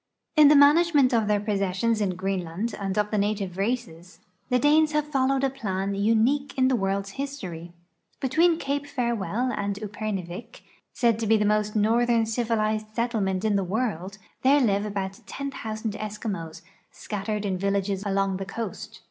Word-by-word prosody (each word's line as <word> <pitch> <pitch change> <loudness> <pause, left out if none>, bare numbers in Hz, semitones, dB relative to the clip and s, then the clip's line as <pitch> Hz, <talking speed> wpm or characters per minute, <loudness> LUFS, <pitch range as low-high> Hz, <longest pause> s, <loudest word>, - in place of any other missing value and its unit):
In 305 -2 +8
the 300 - +7
management 290 -2 +5
of 225 -3 +2
their 210 -1 +2
jjossessions 205 +2 0
in 190 -3 0
Greenland 190 +3 -3
and 195 0 -3
of 210 0 +1
the 210 - +1
native 200 -3 -1
races, 190 -5 -3 0.3
the 250 - +3
Danes 300 +3 +4
have 300 -1 +1
followed 270 -1 +1
a 270 - +3
plan 200 -6 -3
unicpie 230 +8 +1
in 260 0 +4
the 260 - +2
world's 195 -1 -1
history. 180 - -6 0.5
Between 325 +6 +3
Cape 285 -1 -2
Farewell 235 -3 -1
and 200 0 -2
Upernivik, 210 0 -6 0.3
said 235 -3 +1
to 225 - -2
be 220 +1 +5
the 210 - +1
most 210 0 +1
northern 230 +2 +3
civilized 220 -2 -1
settlement 220 -5 -1
in 215 - +2
tlie 195 -2 0
world, 195 -3 -2 0.2
there 275 +3 +5
live 205 -5 +1
about 195 -1 -4
10.( 275 0 -5
X 220 -1 -5
K) 225 - 0
Eskimos, 205 -6 -5 0.3
scattered 210 0 -4
in 190 -2 -1
villages 200 0 -1
along 195 -1 0
the 195 - -5
coast. 225 +4 -6
215 Hz, 165 wpm, -26 LUFS, 195-250 Hz, 0.5 s, In